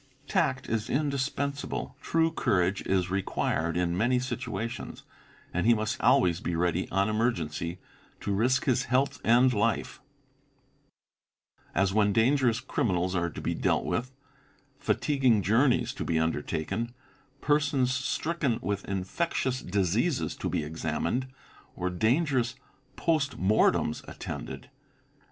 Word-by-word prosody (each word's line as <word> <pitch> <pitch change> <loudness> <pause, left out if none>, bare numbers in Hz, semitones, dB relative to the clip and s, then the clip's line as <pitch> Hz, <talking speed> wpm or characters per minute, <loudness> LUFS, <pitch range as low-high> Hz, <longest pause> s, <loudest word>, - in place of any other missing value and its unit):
'Tact 160 -9 0
is 110 0 -2
indispensable, 140 -1 -2
true 165 0 +2
courage 95 - +1
is 95 -2 +1
required 85 -3 -1
in 90 -1 0
many 120 +6 +2
_ - - -4
situations, 115 -2 -5 0.5
and 90 +5 0
he 120 - +6
must 110 0 -2
be - - -9
always 85 -2 +4
ready 85 +1 0
on 95 +1 +1
emergency 90 -7 -1 0.4
to 100 - -2
risk 125 +6 +2
his 130 -1 +2
health 130 +3 +1
and 125 +3 +5
life; 110 +1 0 1.7
as 95 0 +2
when 105 -1 +3
dangerous 120 +1 +3
criminals 90 -7 0
are 85 -2 0
to - - -8
be - - -1
dealt - - +1
with, 125 +2 -2 0.7
fatiguing 130 -9 +2
journeys 120 - +3
to - - -4
be 80 - 0
undertaken, 80 +8 -2 0.4
persons 140 -4 +2
stricken 135 0 -1
with 100 -1 -2
infectious 125 - -1
diseases 105 - 0
to - - -3
be - - -1
examined, 85 - -2 0.5
or 90 +1 -2
dangerous 125 - +1 0.4
post 155 -4 0
mortems 95 -5 +2
attended. 125 - -7
115 Hz, 125 wpm, -28 LUFS, 95-130 Hz, 1.7 s, he